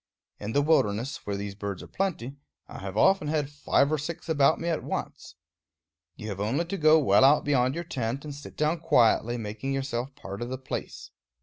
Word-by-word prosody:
In 105 +2 -5
the 145 - +3
wilderness, 125 -6 +1
where 100 - -1
these 100 0 -5
birds 100 -2 -5
are - - -11
plenty, 155 -9 -3 0.3
I - - -9
have 95 +1 -6
often 190 - +4
had 150 -2 -1
five 145 0 +1
or 155 - +1
six 160 +3 -6
about 155 -1 +3
me 170 - -4
at 165 -2 -1
once. - - -5 0.8
You 110 - -7
have 100 -2 -5
only 125 +12 0
to 195 +4 -4
go 155 -1 +6
well 145 -3 +4
out 140 +3 +5
beyond 130 -2 +2
your 170 - -3
tent, 130 -3 -3
and 150 - -6
sit 145 +1 -11
down 155 +3 +1
quietly, 120 -6 +3
making 110 +4 -4
yourself 135 -1 -3
part 100 -8 -8
of 120 - -3
the 130 - -3
place. 130 - -6
135 Hz, 205 wpm, -27 LUFS, 115-155 Hz, 0.8 s, go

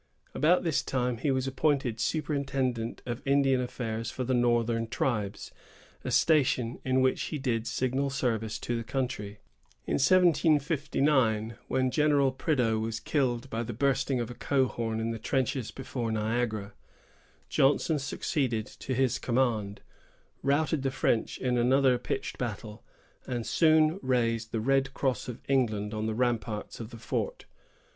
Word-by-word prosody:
About 170 +6 +3
this 165 -4 +1
time, 125 -2 -1
he 145 - -1
was 130 -1 +1
appointed 135 -4 0
superintendent 135 -5 -1
of 120 -1 -4
Indian 135 -2 +3
affairs 115 -2 -3
for 130 - -4
the 130 +1 0
northern 120 -1 +2
tribes, 105 -4 -2 0.5
a - - -3
station 130 -6 +2
in 130 0 +2
which 130 0 +2
he 155 - -3
did 120 -4 -1
signal 130 +3 0
service 115 -5 -1
to 120 - -3
the 115 - -2
country. 110 -5 -4 0.4
In - - 0
1759, 145 -8 +3
when 130 -1 +1
General 145 -2 +3
Prideaux 125 -5 +1
was 110 0 -3
killed 130 -3 0
by 115 - -1
the 120 0 -4
bursting 135 -1 +1
of 120 0 -3
a - - -6
cohorn 120 -4 0
in 115 +1 -1
the 115 - -5
trenches 130 -1 -1
before 125 -3 -4
Niagara, 110 -2 -1 0.7
Johnson 145 +3 +2
succeeded 130 -4 -1
to 130 - -5
his 130 -1 +1
command, 115 -5 0 0.6
routed 145 +2 +1
the 135 - 0
French 125 -3 0
in 125 -1 0
another 130 +1 +4
pitched 135 +2 -4
battle, 110 -2 -5 0.4
and 120 -3 -3
soon 160 +1 +4
raised 115 -3 0
the 110 - -1
red 135 +2 +1
cross 130 -2 -1
of 125 - -7
England 110 -6 +1
on 110 0 -2
the 110 - -2
ramparts 115 -3 -2
of 115 -2 -6
the 120 - -10
fort. 110 - -3
125 Hz, 150 wpm, -29 LUFS, 115-135 Hz, 0.7 s, another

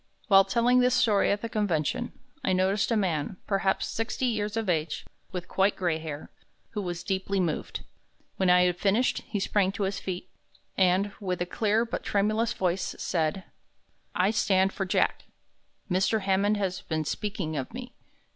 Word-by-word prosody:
While 195 -1 +7
telling 240 +5 +3
this 250 0 +4
story 210 -3 +3
at 205 0 0
the - - -1
convention, 210 - -1 0.3
I 190 - +2
noticed 190 +2 +2
a 230 - +2
man, 180 -3 -1
perhaps 195 -1 +1
sixty 225 +3 -2
years 215 -2 -1
of 225 -2 -1
age, 160 -3 -1 0.3
with 180 -1 -5
quite 195 +1 +2
gray 170 -4 0
hair, 155 -2 -7 0.4
who 210 - -3
was 175 -2 -4
deeply 195 0 -1
moved. 170 -4 -2 0.6
When 190 -1 +2
I 180 0 +6
had 180 -1 +1
finished, 210 +7 +2
he 205 - -2
sprang 195 -1 +1
to 200 - -2
his 195 +1 -1
feet, 185 -1 -5 0.5
and, 190 +2 +3
with 185 -4 -2
a 175 - 0
clear 215 +4 +1
but 235 - -4
tremulous 215 +3 +1
voice, 185 0 -1
said: 165 +2 -1 0.7
"I 185 +3 +3
stand 195 -3 +2
for 195 - -2
Jack. - - +1 0.6
Mr. 190 +4 +1
Hammond 195 +2 +2
has 190 -3 -2
been 155 -1 -2
speaking 190 -4 -3
of 135 -3 -3
me. 250 +1 -8
195 Hz, 170 wpm, -28 LUFS, 180-210 Hz, 0.7 s, While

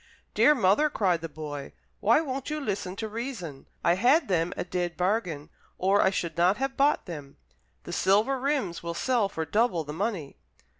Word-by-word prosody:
"Dear 300 - +5
mother," 225 +6 +3
cried 185 - +1
the 165 - -5
boy, 145 -2 -7 0.3
"why 230 +9 +4
won't 270 -3 -4
you 305 0 -2
listen 200 -8 -3
to 220 +2 -4
reason? 215 - -6 0.2
I 170 - +4
had 250 - +3
them 170 -1 +1
a - - -1
dead 175 -1 -3
bargain, 180 -6 -1 0.3
or 195 +2 +3
I - - +4
should 170 -4 -3
not 180 +4 +3
have 270 +1 -2
bought 285 +2 +2
them. 145 -6 -8 0.5
The - - -7
silver 215 +8 +2
rims 265 - -1
will 170 0 -4
sell 235 -1 +1
for 160 -4 -3
double 205 -1 +1
the 150 0 -7
money." 185 -5 -3
195 Hz, 185 wpm, -27 LUFS, 170-245 Hz, 0.5 s, Dear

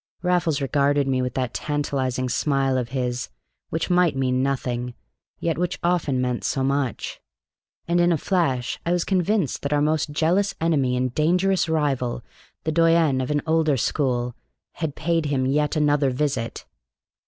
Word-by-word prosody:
Raffles 175 -5 +1
regarded 140 0 +2
me 130 -1 +1
with 125 0 -3
that 130 -2 -2
tantalizing 135 -4 -1
smile 135 +1 +1
of 125 -2 -1
his 125 -2 -2 0.4
which 165 +3 -2
might 175 -4 +3
mean 130 -1 +1
nothing, 125 -2 -2 0.4
yet 165 -1 -1
which 180 0 -1
often 170 -7 +1
meant 125 -1 -1
so 135 - 0
much; 135 -2 -2 0.7
and 175 +1 +2
in 175 0 +4
a 165 - +2
flash 135 -8 0
I 170 - 0
was 175 -1 +1
convinced 190 - 0
that 140 +1 -1
our 145 - +3
most 155 +1 +1
jealous 170 +7 +1
enemy 140 -6 +1
and 125 -1 -1
dangerous 180 +4 +2
rival, 135 -7 0 0.4
the 160 - -1
doyen 165 -4 +3
of 130 - -3
an 145 -1 0
older 160 -3 +2
school, 125 -2 0 0.4
had 160 -4 -4
paid 165 0 0
him 135 -3 0
yet 150 +4 +1
another 145 -2 +2
visit. 130 -3 -2
145 Hz, 160 wpm, -23 LUFS, 130-165 Hz, 0.7 s, in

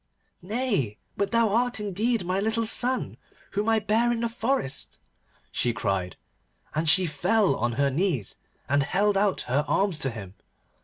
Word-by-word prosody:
'Nay, 200 - -1 0.2
but 200 0 0
thou 230 -1 +3
art 240 +3 +1
indeed 210 +1 0
my 185 +2 0
little 220 +2 0
son, 250 +3 +1 0.3
whom 210 +3 0
I 225 - +4
bare 220 +3 +2
in 235 -1 -1
the 235 - 0
forest,' 230 - -2 0.5
she 120 - 0
cried, 95 -4 -2 0.6
and 155 +1 +1
she 185 +3 +4
fell 185 +7 +2
on 120 +1 -1
her 140 +3 +1
knees, 155 - 0 0.3
and 140 +1 +2
held 195 +8 +1
out 195 0 +2
her 135 +4 0
arms 195 -5 +1
to 135 - +2
him. 100 -6 -8
195 Hz, 160 wpm, -26 LUFS, 140-225 Hz, 0.6 s, I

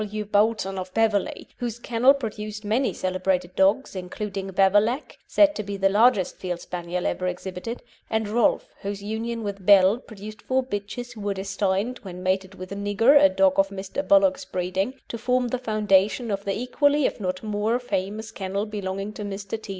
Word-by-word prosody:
W. 210 0 -4
Boulton, 205 -2 +1
of 185 0 -6
Beverley, 220 -3 +1
whose 240 -2 -4
kennel 240 +3 +3
produced 215 -4 -6
many 235 +6 +1
celebrated 185 -1 -1
dogs, 200 +6 +2
including 195 +1 -5
Beverlac, 205 +8 +2
said 300 -1 +5
to 220 - -3
be 200 -1 -5
the 195 0 +3
largest 210 -1 +3
Field 180 -2 -4
Spaniel 175 0 -4
ever 185 - -1
exhibited, 180 +5 -5 0.3
and 220 -1 0
Rolf, 220 +2 +2
whose 200 0 -5
union 225 +2 -3
with 200 -2 -5
Belle 195 +3 +6
produced 215 -2 -10
four 260 0 0
bitches 240 +1 -5
who 220 - -10
were 200 -1 -2
destined, 195 +4 -1
when 180 -2 -9
mated 190 +1 -1
with 185 0 -9
Nigger, 205 +8 +4
a 195 - +8
dog 190 0 +3
of 195 0 +4
Mr. 195 +6 -4
Bullock's 290 -1 +4
breeding, 185 +5 -2
to 235 - -6
form 250 +1 +1
the 255 - -2
foundation 215 0 +2
of 200 0 -3
the 195 0 -1
equally 285 +3 +2
if - - -1
not 185 -1 -3
more 215 +2 0
famous 215 -1 -3
kennel 200 0 -3
belonging 200 -1 -4
to 210 - -8
Mr. 200 +2 -5
T. 215 - -12
205 Hz, 180 wpm, -25 LUFS, 190-225 Hz, 0.3 s, a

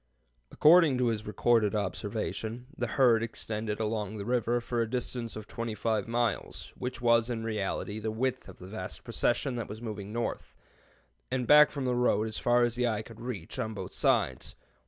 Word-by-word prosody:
According 155 -3 +6
to 125 -1 +2
his 110 -2 -3
recorded 110 0 +2
observation, 110 +4 -3
the - - -2
herd 120 -4 +4
extended 110 -1 -3
along 110 -1 -2
the 100 - -5
river 120 0 +1
for 120 0 -2
a 115 - -1
distance 120 -1 -3
of 110 -1 -7
25 110 -2 -2
miles, 120 0 -2
which 125 0 -5
was 115 0 +4
in 115 -2 -3
reality 105 -1 -2
the 110 +1 -3
width 125 +1 -2
of 95 - -12
the 90 - -11
vast 95 -1 -6
procession 130 -3 0
that 115 - -4
was 105 +1 -7
moving 105 -3 -6
north, 120 +1 -4 0.7
and 125 -1 -1
back 150 +3 +8
from 140 -3 -4
the 125 - +1
road 120 -3 +2
as 110 - -4
far 120 0 +3
as 120 -1 +1
the 125 0 +1
eye 110 -2 -1
could 115 0 -13
reach, 115 -9 -5
on 110 0 -2
both 95 -1 -6
sides. 110 - +1
115 Hz, 185 wpm, -30 LUFS, 105-120 Hz, 0.7 s, back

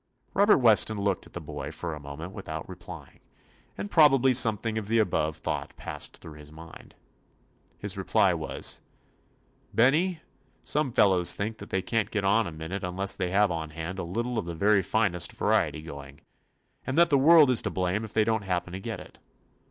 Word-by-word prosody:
Robert 205 +2 +5
Weston 110 -3 +4
looked 100 -2 -2
at - - -22
the - - -5
boy - - -7
for 85 -2 -5
a 75 - -7
moment 75 +5 -8
without 80 -6 -7
replying, - - -11 0.6
and 100 +1 -6
probably 135 -4 +5
something 110 -2 +2
of 105 - -8
the 115 +2 +1
above 80 -7 0
thought - - -5
passed - - -4
through 75 -2 -12
his 75 0 -13
mind. 80 +1 -13 0.8
His - - -4
reply - - +2
was: - - -1 0.9
"Benny, 160 +8 +2 0.4
some 145 +2 0
fel 105 - +4
lows 90 -2 +2
think 110 +2 -4
that - - -10
they 95 -1 -1
can't 110 -3 -1
get 105 -4 -2
on 100 +1 +3
a - - -6
minute 80 +5 -6
unless 95 +2 0
they 90 -2 -2
have 100 +1 +2
on 80 -2 -4
hand 80 +4 -6
a - - -3
lit 95 +8 -3
tle 125 -2 -2
of 105 - -5
the 85 -1 -6
very 100 +3 +3
finest 95 -2 0
variety 80 - 0
going, 70 -2 -10 0.6
and 130 - -4
that 170 -1 +5
the 140 - +5
world 150 -1 +6
is 125 - +3
to - - -2
blame 95 +3 -1
if 110 - -8
they 110 - +3
don't 110 0 0
happen 90 -2 -3
to 95 - -5
get - - -6
it. - - -14
100 Hz, 200 wpm, -27 LUFS, 85-115 Hz, 0.9 s, world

